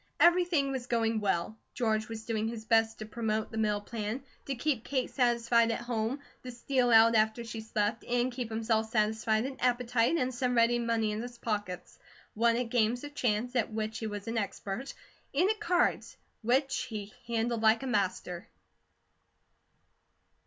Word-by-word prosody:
Everything 345 -5 +4
was 255 -2 -4
going 225 -2 +1
well. 205 +1 -1 0.2
George 220 -2 0
was 225 -1 -6
doing 220 -1 -1
his 225 -1 -6
best 225 0 +3
to 215 - -6
promote 220 -1 -2
the 225 - -5
mill 210 -1 +1
plan, 220 +4 -4 0.2
to 275 - -1
keep 255 -2 -1
Kate 260 -2 -2
satisfied 235 -2 +3
at 230 - -1
home, 240 +1 -1 0.2
to 255 - -8
steal 245 +1 0
out 225 0 +7
after 220 +1 +2
she 225 -1 -6
slept, 220 0 -1
and 245 +1 +1
keep 240 -2 -4
himself 220 0 0
satisfied 220 +1 +1
in 270 0 -6
appetite, 245 +3 +2
and 255 -3 0
some 250 0 0
ready 235 +1 +4
money 230 -2 0
in 210 +1 -3
his 245 0 -8
pockets, 205 -6 -4 0.3
won 230 +1 +3
at 245 -1 -2
games 240 +1 +1
of 290 0 -7
chance, 245 -1 -1
at 230 -2 +1
which 220 0 -3
he 220 - -3
was 205 -1 -6
an 230 0 0
expert, 205 +5 -4 0.4
and 365 +8 +4
at 435 - -4
cards, 355 -2 +1 0.2
which 255 +3 +1
he 210 -2 -6
handled 230 0 0
like 225 +3 +4
a - - -3
master. 190 -3 -2
230 Hz, 175 wpm, -30 LUFS, 220-245 Hz, 0.4 s, out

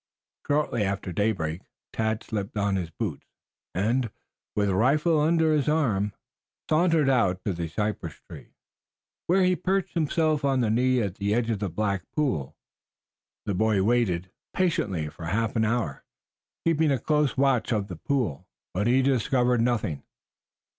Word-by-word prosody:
Shortly 145 -5 +1
after 95 -1 -2
daybreak 90 -5 -1 0.3
Tad 110 0 -1
slipped 105 +1 -4
on 100 -1 +1
his 90 -3 -2
boots, - - -5 0.5
and, 115 +6 +1 0.5
with 100 -1 +2
rifle 150 - +3
under 160 +1 +3
his 150 -2 +1
arm, 105 -10 +1 0.5
sauntered 160 -2 +3
out 100 -9 +2
to 100 - -1
the 85 -1 -3
cypress 105 -3 -3
tree, - - -12 0.7
where 185 +2 +4
he 180 0 +3
perched 190 +1 -1
himself 155 -2 +1
on 135 -2 +2
the 110 -3 +1
knees 125 +1 +2
at 95 -2 -5
the 100 +1 0
edge 115 -1 0
of 110 - -1
the 100 -2 -2
black 100 +2 -1
pool. 130 - -1 0.9
The 100 - -1
boy 105 0 +2
waited 95 -6 +1 0.2
patiently 100 - 0
for 85 +3 -9
half 110 +6 -1
an 110 -1 +2
hour, 110 - -1 0.6
keeping 160 -2 +3
a 135 - +2
close 150 +3 +1
watch 135 -3 +2
of 105 -3 0
the - - -6
pool, 110 - -2 0.3
but 105 +4 0
he 130 +2 +4
discovered 125 -2 +2
nothing. 115 - 0
115 Hz, 155 wpm, -26 LUFS, 100-145 Hz, 0.9 s, where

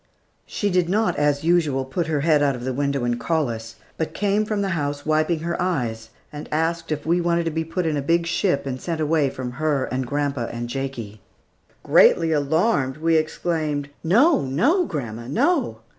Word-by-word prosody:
She 205 -1 -1
did 180 -1 +1
not, 215 +4 +1
as 145 -1 +1
usual, 155 -6 +2
put 165 +5 -2
her 155 -3 0
head 155 -1 +3
out 140 -2 +2
of 120 - -8
the 130 +1 -2
window 140 0 -1
and 120 0 -1
call 155 +1 0
us, 115 0 -7 0.2
but 160 - -3
came 205 +1 +1
from 210 -1 -1
the 195 - -1
house 145 -4 -2
wiping 155 +1 +1
her 170 +1 -2
eyes, 120 -11 -2 0.2
and 150 0 -8
asked 165 +2 -1
if 150 -1 -3
we 170 +2 +2
wanted 170 0 +1
to 165 - -1
be 160 +1 -1
put 165 +2 -3
in 155 -2 0
a 145 - -1
big 170 +4 +1
ship 170 -4 0
and 130 -1 -4
sent 165 -2 -3
away 155 -2 +2
from 130 -1 -5
her 145 -4 +1
and 130 0 -3
grandma 140 -3 -1
and 120 0 -5
Jakie. 120 -6 -5 0.6
Greatly 165 -1 +5
alarmed, 150 - +1
we 165 +1 +2
exclaimed, 155 -2 -1
"No, 240 - +4
no, 250 - +1
grandma, 115 -6 -5
no!" 150 - 0
155 Hz, 195 wpm, -23 LUFS, 135-170 Hz, 0.6 s, Greatly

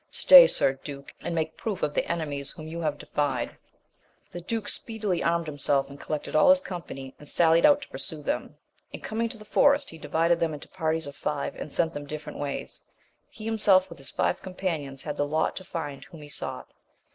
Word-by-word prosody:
Stay, - - +9
sir 135 - +2
duke, 140 -1 -8
and 170 - -3
make 160 -1 -1
proof 210 -4 -4
of 150 - 0
the - - -1
enemies 145 -4 -2
whom 155 -3 -6
you 165 +1 -5
have 150 -2 -1
defied 140 -5 -1
1 - - -22 0.7
The 175 - -7
duke 220 +4 -3
speedily 215 -6 -2
armed 170 0 +1
himself 140 -2 +1
and 140 - -11
collected 155 0 -4
all 155 - +6
his 280 0 +7
company, 150 - -7
and 150 - -11
sallied 165 0 +5
out 290 0 +4
to - - -11
pursue - - -1
them; - - -3 0.3
and - - -8
coming 230 +1 -1
to 225 - -6
the 215 - -13
forest 285 +4 +3
he 165 - -11
divided 165 +2 +1
them 160 -2 0
into 145 - -11
parties 160 -2 -1
of 140 -1 -8
five, 145 0 -3
and 150 - -7
sent 165 +2 0
them 145 0 -6
different 150 +1 -7
ways. 145 -1 -4 0.5
He 215 - -10
himself 200 -4 +4
with 170 - -11
his 135 - -5
five - - 0
companions 160 -8 -4
had 150 -1 -4
the 145 - 0
lot 155 +2 0
to 185 - -6
find 150 -6 -5
whom 160 -3 -12
he 145 - -11
sought. - - -4
160 Hz, 215 wpm, -27 LUFS, 145-185 Hz, 0.7 s, Stay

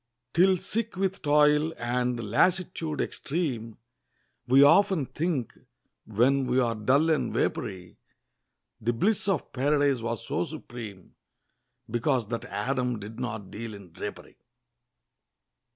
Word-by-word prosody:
Till 185 +2 +5
sick 230 +5 -2
with 190 +1 -1
toil, 150 +1 +3
and 120 0 -1
lassitude 165 - +1
extreme, 130 -9 -3 0.7
We 135 +3 +7
often 170 +1 +5
think, 150 - -2 0.5
when 125 +5 +2
we 130 - +2
are 120 -2 +2
dull 135 +9 +2
and 155 - +1
vapoury, 90 -2 -2 0.8
The 120 +2 +1
bliss 200 - +1
of 190 -8 -1
Paradise 140 -1 +2
was 115 -2 -3
so - - -1
supreme, 110 -6 -9 0.7
Because 120 0 0
that 115 -1 -3
Adam 125 +2 -1
did 110 +3 -9
not 110 -6 -5
deal 110 0 -6
in 100 -4 -13
drapery. - - -8
130 Hz, 120 wpm, -27 LUFS, 115-155 Hz, 0.8 s, We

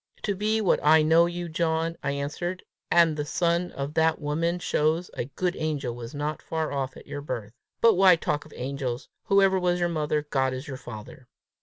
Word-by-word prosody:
"To 205 - 0
be 215 +3 0
what 195 - +3
I 155 +1 +6
know 165 +2 +5
you, 175 0 -4
John," 165 0 0
I 140 0 -1
answered, 160 +6 -4 0.3
"and 170 -2 +5
the 150 - -2
son 170 +3 0
of 140 +2 -4
that 160 0 +2
woman, 165 +4 -1
shows 165 0 0
a - - -3
good 175 +7 -2
angel 145 -6 -2
was 120 +2 -8
not 150 +1 -3
far 160 -1 -3
off 135 -2 -3
at - - -13
your 145 0 -6
birth. 120 -7 -5 0.3
But 230 -1 +7
why 185 -1 +6
talk 150 -2 -2
of 155 - -16
angels? 130 -1 -4 0.2
Whoever 195 -1 +4
was 180 -1 +1
your 175 0 +1
mother, 150 -2 -1
God 130 -2 0
is 130 +4 -7
your 135 -3 -5
father!" 120 0 -10
155 Hz, 200 wpm, -26 LUFS, 140-175 Hz, 0.3 s, But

